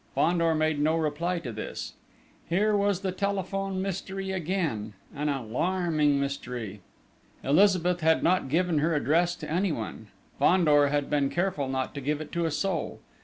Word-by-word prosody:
Fandor 170 -1 +2
made 155 -1 +1
no 155 +2 +2
reply 165 +3 -1
to 150 -8 -5
this. - - -6 0.6
Here 210 +5 +2
was 200 -2 +1
the 190 -2 -1
telephone 195 0 -2
mystery 195 0 -4
again 165 - -2 0.2
an 150 +1 -1
alarming 150 +3 +1
mystery. 125 -7 -4 0.6
Elizabeth 180 +2 +3
had 160 0 +3
not 180 -5 +2
given 170 +1 +2
her 160 +2 +1
address 170 +4 +2
to - - -8
anyone: 155 - -2 0.3
Fandor 150 -2 +5
had 145 0 0
been 145 -2 +1
careful 175 -5 -1
not 130 0 -2
to 140 - -5
give 150 +2 -1
it 155 - -7
to 170 0 -1
a - - +1
soul.... 170 +2 -2
165 Hz, 155 wpm, -27 LUFS, 145-185 Hz, 0.6 s, Fandor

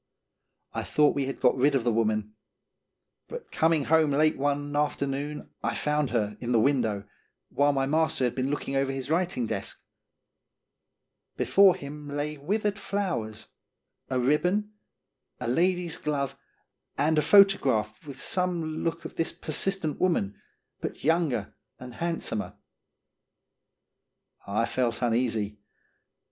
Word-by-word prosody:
I - - -2
thought 150 -1 +3
we 140 -2 -1
had 135 - -5
got 125 - +4
rid 140 +2 +3
of 130 - +1
the 120 - +2
woman; 110 -1 0 0.9
but 480 -1 -8
coming 160 -2 +2
home 160 +1 +3
late 155 +2 +3
one 145 +1 -1
after 145 -1 +1
noon 145 +2 -4
I - - -1
found 150 -2 0
her 105 -3 -1
in 120 0 -3
the 115 - +5
window, 110 -6 +1 0.4
while 145 +1 +3
my 135 -1 0
master 155 -1 +1
had 125 - +1
been 130 +1 -1
looking 140 -1 -3
over 135 0 +1
his 135 +1 -4
writing 170 -7 +1
desk. - - -4 1.6
Before 195 -2 +5
him 145 +1 -8
lay 145 +1 -3
withered 205 +7 -1
flowers, 170 - -3 0.6
a 130 -1 0
ribbon, 180 +11 +1 0.7
a - - -4
lady's 175 +5 +1
glove, 140 -2 -2 0.6
and 155 +1 +3
a - - +3
photograph 135 - +4
with 140 -3 -9
some 170 -2 -1
look 165 0 -2
of - - -8
this 165 - 0
persistent 160 0 -1
woman, 160 - +1 0.5
but - - -6
younger 150 - +1 0.3
and 125 -1 -9
handsomer. 165 -8 -3 1.9
I 105 +3 +1
felt 120 -1 -1
uneasy. 115 -3 +1
Mr. 105 - -25
145 Hz, 135 wpm, -27 LUFS, 125-160 Hz, 1.9 s, the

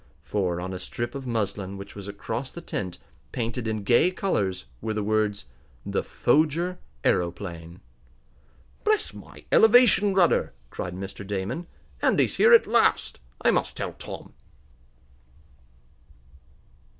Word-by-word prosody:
For, 90 -4 -1
on 95 +1 -4
a 90 - -5
strip 120 +4 -4
of 135 -2 -6
muslin 100 -4 -2
which 100 0 -9
was 100 -1 -8
across 110 +5 -4
the - - -9
tent, 95 - -4 0.3
painted 115 0 -3
in 110 -2 -2
gay 120 - +4
colors, 100 - -1 0.2
were 110 - -2
the 105 - -1
words: 105 -2 0 0.4
THE - - 0
FOGER 160 +7 +1 0.2
AEROPLANE 85 -1 -2 1.0
"Bless 430 -1 +1
my - - -13
elevation 220 -3 +6
rudder!" 180 -3 +3 0.2
cried 90 0 -5
Mr. 95 +2 -7
Damon. 100 - -3 0.3
"Andy's - - +2
here 465 - +6
at 470 - +8
last! 235 - +2 0.2
I - - +5
must - - -1
tell - - -3
Tom!" - - -9
110 Hz, 125 wpm, -26 LUFS, -, 1.0 s, at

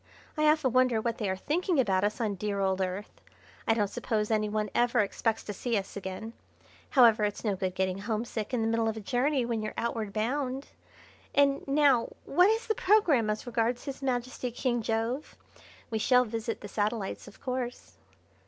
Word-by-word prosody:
I 305 -1 +2
often 305 -5 +2
wonder 255 -3 +4
what 230 +1 -2
they 210 -4 -1
are 190 - 0
thinking 330 - 0
about 195 -6 +2
us 205 +1 0
on 220 -3 0
the 200 - -5
dear 205 +1 -2
old 190 -1 +1
Earth. 190 +2 -4 0.5
I 225 - +4
don't 210 -2 +1
suppose 215 +1 -2
any 215 -1 +1
one 210 -1 -1
ever 240 +1 +2
expects 220 +2 -1
to 205 - -5
see 230 +3 -1
us 195 -1 -5
again. 200 +3 -6 0.6
However, 230 -5 +6
it's 205 -1 -1
no 210 -3 +1
good 185 -1 -3
getting 185 0 -1
homesick 220 +1 -3
in 250 -3 0
the - - +1
middle 225 0 +1
of 220 - -4
a - - -3
journey 255 +4 +1
when 230 -2 -1
you're 215 - -5
outward 230 -3 -2
bound. 260 +5 -2 0.7
And 280 -1 +3
now 275 -4 +4 0.2
what 360 +7 +4
is 445 +1 +1
the 440 - +1
programme 360 - +3
as 215 +3 -2
regards 240 0 -1
His 275 -1 -6
Majesty 250 -1 -2
King 240 0 -1
Jove? 225 +6 -2 0.5
We 220 - 0
shall 250 +3 +4
visit 230 +1 -4
the 205 - -7
satellites 210 0 -2
of - - -14
course?" 250 -2 -5
230 Hz, 195 wpm, -29 LUFS, 210-255 Hz, 0.7 s, However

